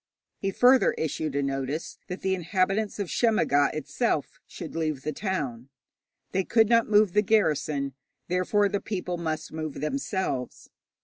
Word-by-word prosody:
He 195 - -1
further 250 +6 +5
issued 155 -1 -3
a 140 - +1
notice 135 +3 -3
that 180 -1 -6
the 190 - +1
inhabitants 190 +4 0
of 200 -3 -2
Shemmaga 165 - +3
itself 155 - -2
should 165 -3 -8
leave 155 -4 -2
the 155 - -1
town. 140 - -3 0.6
They 190 - +1
could 220 +2 +3
not 230 -2 +4
move 210 -3 +4
the 210 - +5
garrison, 155 -9 +1 0.3
therefore 185 +3 +2
the 200 0 -2
people 180 -4 -3
must 155 -2 -3
move 155 -2 -4
themselves. 170 - -3
180 Hz, 145 wpm, -27 LUFS, 150-205 Hz, 0.6 s, further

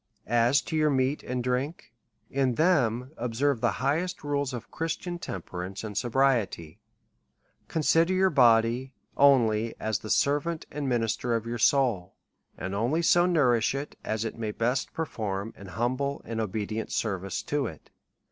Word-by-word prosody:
As 120 +4 +3
to - - -5
your 155 -1 +3
meat 135 +1 +1
and 125 -1 -3
drink, 125 +2 -2 0.4
in 130 -3 +1
them 130 -7 +2
observe 125 +2 0
the 120 - +2
highest 170 +6 0
rules 145 -2 -1
of 120 -2 -7
Christian 175 +2 -3
temperance 95 - -6
and 105 -2 -6
sobriety; 120 - 0 0.9
consider 165 +2 +2
your 190 0 +3
body 120 0 +3 0.2
only 115 -5 +4
as 110 -2 -1
the 110 - -9
servant 150 +6 +1
and 145 -2 -3
minister 120 0 0
of 115 -1 -2
your 120 0 -4
soul; 115 -7 +2 0.4
and 95 +2 -4
only 120 +11 0
so 175 +1 +5
nourish 130 -9 +3
it, 140 +2 -5
as 110 +1 -2
it 115 - -4
may 110 -2 -2
best 120 +5 -1
per 160 - -2
form 105 -4 -4
an 100 - -11
humble 130 +7 -2
and 115 -1 -3
obedient 110 +1 -3
service 95 -3 -2
to 145 -3 -1
it. 80 - -11
125 Hz, 155 wpm, -27 LUFS, 110-145 Hz, 0.9 s, so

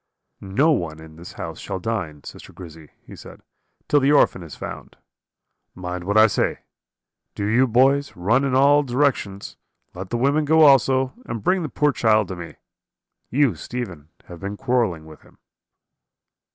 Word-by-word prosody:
"'No 125 +12 +1
one 80 - -2
in 80 0 -13
the 85 +2 -11
house 80 -1 -7
shall 95 - -5
dine, 90 -8 -4
sister - - -11
Grizzy,' 80 -4 -12 0.2
he - - -12
said, - - -13 0.5
'till 145 - +3
the 140 +1 +2
orphan 140 -9 +3
is 80 -3 -10
found. - - -9 0.8
Mind 90 -1 -6
what 100 +2 0
I 110 - +8
say. 105 - -1 0.7
Do 100 - -3
you, 120 +5 +3
boys, 135 +4 +2
run 110 +10 +1
in 135 -2 0
all 140 +2 +5
directions; 125 -7 -2 0.4
let 90 +1 -8
the 120 - -2
women 140 +5 +1
go 160 +2 +3
also, 135 -2 +4
and 115 -3 -5
bring 185 - +1
the 155 - -4
poor 150 +2 +1
child 110 -6 +2
to 95 - -5
me. 85 -1 -9 0.7
You, 140 -3 +2
Stephen, 85 -3 -7 0.2
have 85 -1 -11
been 100 +1 -6
quarrelling 110 -12 -1
with 80 -1 -14
him.' - - -23
110 Hz, 165 wpm, -22 LUFS, 90-135 Hz, 0.8 s, I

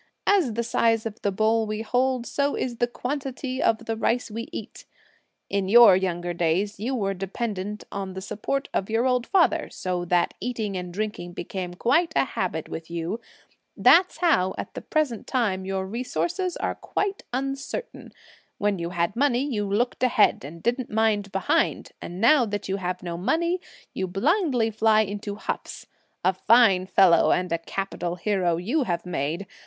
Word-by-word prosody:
As 365 - +3
the 235 - 0
size 225 -1 +1
of 220 -1 -6
the 200 - 0
bowl 220 +2 +2
we 215 +1 -3
hold, 250 +1 +1
so 285 +2 0
is 240 -2 -3
the 240 - +2
quantity 260 +1 -4
of 220 - +1
the 225 - -2
rice 230 +1 0
we 230 +2 -5
eat. - - -8 0.6
In 195 -1 -1
your 230 -3 +9
young 180 -2 -1
days, 175 +5 0
you 250 +5 -2
were 195 -4 -1
dependent 200 +1 -4
on 195 -1 -4
the - - -4
support 265 +8 -3
of 195 - -1
your 225 +3 +1
old 250 -1 +1
father, 335 -4 +2
so 180 -1 -3
that 175 0 +2
eating 220 -5 -3
and 180 -1 -4
drinking 200 -3 -4
became 175 0 -5
quite 320 - +2
a - - +3
habit 180 - -3
with 160 0 -7
you; 170 +6 -3 0.6
that's 365 +2 +5
how, 190 - +2
at - - -6
the - - -6
present 295 -8 -1
time, 205 -8 0
your 190 0 -2
resources 345 - -2
are - - -1
quite 400 0 -3
uncertain; 275 - -4 0.5
when 205 -2 0
you 170 0 -3
had 170 +1 -1
money, 265 0 +2
you 210 -8 -2
looked 235 +5 0
ahead, 250 -4 +3
and 165 +4 -9
didn't 245 +1 0
mind 210 -2 +1
behind; 195 -1 0
and 175 +1 -7
now 250 +5 +5
that 205 -3 -3
you 195 +1 -1
have 180 -1 -4
no 170 -1 -4
money, 340 - 0 0.3
you 190 - -2
blindly 250 - +1
fly 220 0 +4
into 205 0 -4
huffs. - - -5 0.4
A 185 - +4
fine 195 -2 +4
fellow 185 -3 +5
and 180 -1 0
a 170 - +1
capital 175 0 -4
hero 180 -3 0
you 245 - 0
have 175 -4 -2
made! 170 +2 -2
215 Hz, 175 wpm, -25 LUFS, 185-250 Hz, 0.6 s, your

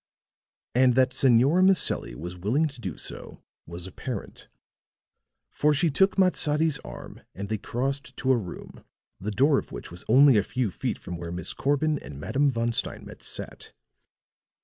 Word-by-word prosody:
And 125 0 +4
that 130 0 +3
Senora 135 +7 +4
Maselli 190 -1 +2
was 90 +3 -7
willing 115 - +1
to 130 -4 -14
do 95 -7 -5
so - - -7 0.2
was 85 +1 -6
apparent; 120 +6 -7 1.0
for 150 0 +2
she 155 +3 +2
took 190 +8 +2
Matsadi's 160 -5 +2
arm - - -10
and 100 +1 -6
they 110 -1 -1
crossed 135 +6 -3
to 130 - +1
a - - +5
room, 100 -7 -7 0.4
the 105 - -4
door 135 +6 +3
of - - -10
which - - -8
was 90 +1 -8
only 135 +1 +7
a 100 - +3
few 125 -2 -2
feet - - -3
from 90 - -7
where 85 0 -6
Miss 90 0 -4
Corbin 145 +2 +1
and 70 -1 -10
Madame 140 - +1
Von 115 -2 -1
Steinmetz - - -4
sat. - - -6
130 Hz, 165 wpm, -26 LUFS, 100-145 Hz, 1.0 s, only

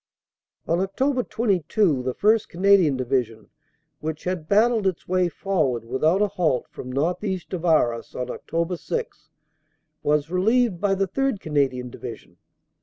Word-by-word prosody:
On 170 +2 +1
Oct. 250 +7 0
22 190 - +1
the 125 0 -3
1st. 220 +1 +3
Canadian 180 -6 +4
Division, 120 -4 -2 0.5
which 155 0 -5
had 180 -4 -3
battled 215 0 +3
its 185 -4 -3
way 185 -1 +2
forward 155 -12 -1
without 155 - +2
a - - +3
halt 180 -9 0
from 130 - -8
northeast 180 +7 -2
of 175 -2 -3
Arras 120 -8 +1
on 125 - -2
Oct. 170 +5 -3
6, 470 -1 -5 0.7
was 150 +2 +1
relieved 210 +1 +2
by 200 -1 +2
the 195 0 0
3rd. 270 +2 -1
Canadian 135 -6 -1
Division. - - -9
180 Hz, 140 wpm, -24 LUFS, 145-200 Hz, 0.7 s, Canadian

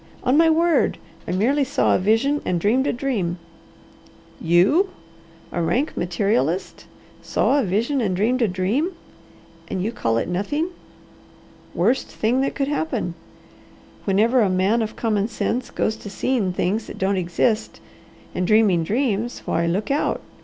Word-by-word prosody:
On 255 - +2
my 325 +1 +5
word! 330 +1 +2 0.3
I - - -2
merely 250 +11 +2
saw 275 +1 +1
a - - +3
vision 225 +9 +2
and 175 - 0
dreamed 245 +9 +2
a - - +2
dream." 230 -9 -2 1.0
"You! 190 - +3 0.6
A 175 - -2
rank 250 - 0
materialist! 175 -2 -1 0.3
Saw 285 - +1
a - - +1
vision 230 +8 0
and 195 -5 0
dreamed 235 +7 +1
a 230 - +4
dream! 205 - -1 0.7
And 185 - -3
you 220 - -1
call 115 - -1
it - - -1
nothing. 250 - -1 1.1
Worst 230 +10 +1
thing 240 +4 0
that 275 - -1
could 275 - -1
happen! 175 - -2 0.9
Whenever 225 +6 +3
a 205 - +3
man 190 +5 +2
of 220 - -3
common 215 -3 0
sense 245 +1 -2
goes 220 - -1
to 205 - -9
seeing 205 -1 0
things 195 +5 -1
that - - -9
don't 195 +1 +1
exist, 185 +5 0 0.5
and 180 - -1
dreaming 210 -6 +4
dreams, 230 - -1
why 170 +1 0
look 195 +9 -1
out! 285 - 0
215 Hz, 155 wpm, -22 LUFS, 185-260 Hz, 1.1 s, my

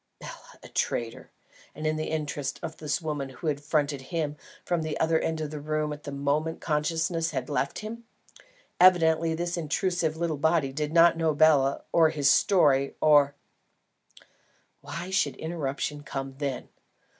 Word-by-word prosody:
Bela - - -11
a - - -10
traitor, 115 -1 -3 0.5
and 155 - -6
in 155 0 +1
the 155 0 -3
interests 145 -3 -3
of 160 -1 -6
the 150 -2 -2
woman 145 -3 -3
who 130 +5 -11
had 145 -2 -1
fronted 145 -2 0
him 155 -4 -2 0.3
from 175 -2 0
the 155 -1 -3
other 160 0 +2
end 160 -1 -2
of 150 -1 -4
the 150 - -5
room 155 0 -2
at 150 0 -11
the 145 - -5
moment 145 +3 -1
consciousness 165 +2 -1
had 140 -1 -4
left 140 -1 -1
him! 230 +2 -7 0.8
Evidently 165 -3 +5
this 175 +1 -3
intrusive 165 0 -1
little 165 -2 -1
body 155 -2 +1
did 150 +1 -2
not 170 0 +5
know 160 -2 +1
Bela 145 -3 +4
or 165 -2 +5
his 145 -3 +3
story, 140 -8 +3
or 145 -2 +5 1.5
Why 175 +2 -6
should 190 - +1
interruption 150 -2 -3
come 135 -1 -5
then? 140 -3 -3
155 Hz, 160 wpm, -27 LUFS, 145-165 Hz, 1.5 s, Evidently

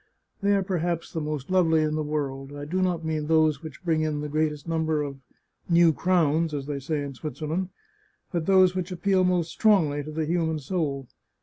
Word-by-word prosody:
They 200 0 +3
are 195 - +1
perhaps 175 -3 -2
the 160 - -2
most 150 0 -4
lovely 165 -4 +4
in 155 0 0
the 155 - -1
world. 145 -2 -3
I 145 0 -6
do 185 +5 -1
not 175 -3 0
mean 155 -2 -2
those 155 -2 +3
which 160 +2 -10
bring 160 -2 +2
in 155 -1 -1
the 150 - -4
great 155 +1 +1
est 150 +1 -10
number 160 -2 0
of 140 -1 -6 0.3
" - - -38
new 170 -2 +6
crowns," 165 0 +1
as 140 -2 -4
they 145 -1 -3
say 145 +2 -2
in 140 -1 -6
Switzerland, 155 +6 -4 0.6
but 170 -3 -2
those 185 -2 +5
which 185 0 -3
appeal 185 +1 +2
most 180 -2 +1
strongly 165 -10 +3
to 150 - -8
the 155 +1 -2
human 160 -1 0
soul. 145 -3 -2
160 Hz, 210 wpm, -26 LUFS, 150-175 Hz, 0.6 s, new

